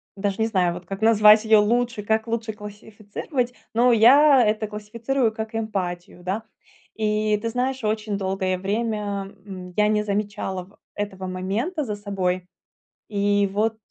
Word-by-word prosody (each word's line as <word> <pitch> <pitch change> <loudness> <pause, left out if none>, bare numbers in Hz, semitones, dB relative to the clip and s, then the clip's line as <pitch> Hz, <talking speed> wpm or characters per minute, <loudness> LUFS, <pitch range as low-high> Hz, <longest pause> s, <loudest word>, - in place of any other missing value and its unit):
даже 195 0 -2
не 220 - +3
знаю, 185 -5 +1
вот, 175 0 -9
как 195 +1 -6
назвать 215 -1 +6
её 220 -1 +6
лучше, 235 0 0
как 220 +2 0
лучше 225 -1 -2
классифицировать, 215 +5 -5 0.2
но 240 +2 +4
я 260 +3 +7
это 215 0 0
классифицирую 225 +4 -1
как 220 0 -6
эмпатию, 180 -5 -4
да. 195 +5 -2 0.5
И, 215 -1 +1
ты 230 +2 -3
знаешь, 255 +1 -2
очень 210 -1 -1
долгое 190 -1 -1
время, 205 -1 -2
м, 185 -2 -9
я 210 0 +3
не 210 0 +1
замечала 200 -2 -3 0.2
этого 195 -2 -5
момента 210 - -2
за 210 -5 -3
собой. 185 -3 -2 0.6
И 205 -1 +1
вот 220 +2 0
210 Hz, 145 wpm, -23 LUFS, 200-225 Hz, 0.6 s, я